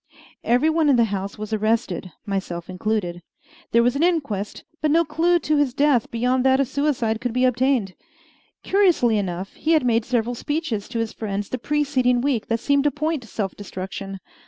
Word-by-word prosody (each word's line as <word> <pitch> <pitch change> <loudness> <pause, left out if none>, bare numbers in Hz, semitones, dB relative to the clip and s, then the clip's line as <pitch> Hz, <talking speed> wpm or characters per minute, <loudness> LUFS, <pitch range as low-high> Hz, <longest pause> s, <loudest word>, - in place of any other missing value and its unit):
Every 245 +6 +3
one 315 -2 +2
in 275 - +5
the 235 - +4
house 195 +1 -4
was 215 +1 -5
arrested, 215 -4 0
myself 190 -4 -4
included. 185 -3 -2 0.5
There 235 0 +4
was 245 +2 +2
an 280 - -1
inquest; 280 - -1 0.2
but 310 - +2
no 335 +3 +4
clew 330 +4 +2
to 310 -3 0
his 275 -4 +1
death 280 -5 +2
beyond 250 +2 +1
that 265 0 +4
of 275 - +2
suicide 255 -5 0
could 245 -2 -2
be 255 +1 +2
obtained. 250 -5 +1 0.7
Curiously 345 - +3
enough, 185 0 -4
he 325 - 0
had 310 -5 +3
made 230 -1 +2
several 240 0 0
speeches 255 -5 -3
to 240 - -4
his 225 -1 -2
friends 205 -2 -4
the 255 - -3
preceding 265 -3 +1
week 250 -4 0
that 230 0 0
seemed 280 0 +2
to - - +5
point 305 0 -2
to 230 - -13
self 200 -3 -3
destruction. 195 0 -6
245 Hz, 190 wpm, -23 LUFS, 210-290 Hz, 0.7 s, in